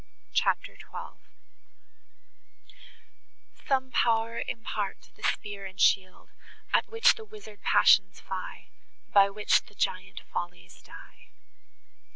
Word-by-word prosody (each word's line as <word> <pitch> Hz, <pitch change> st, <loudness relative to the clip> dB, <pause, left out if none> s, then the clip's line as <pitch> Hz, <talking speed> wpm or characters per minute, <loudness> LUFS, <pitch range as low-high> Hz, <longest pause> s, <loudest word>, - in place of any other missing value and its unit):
CHAPTER -, -, +1 dB
XII -, -, -10 dB, 2.5 s
Some 260 Hz, -2 st, +1 dB
pow'r 230 Hz, -1 st, +1 dB
impart 210 Hz, -3 st, -4 dB
the -, -, -21 dB
spear 200 Hz, -2 st, -2 dB
and 190 Hz, +1 st, -14 dB
shield, 185 Hz, -2 st, +2 dB, 0.4 s
At -, -, +3 dB
which 455 Hz, +2 st, +5 dB
the 450 Hz, -, -10 dB
wizard 415 Hz, -, -13 dB
passions 195 Hz, 0 st, +5 dB
fly, 185 Hz, -1 st, -7 dB, 0.4 s
By 200 Hz, -1 st, +7 dB
which 210 Hz, +1 st, +2 dB
the 205 Hz, -, -18 dB
giant 185 Hz, 0 st, -2 dB
follies 90 Hz, -, -6 dB
die! -, -, -15 dB
205 Hz, 105 wpm, -28 LUFS, 190-235 Hz, 2.5 s, By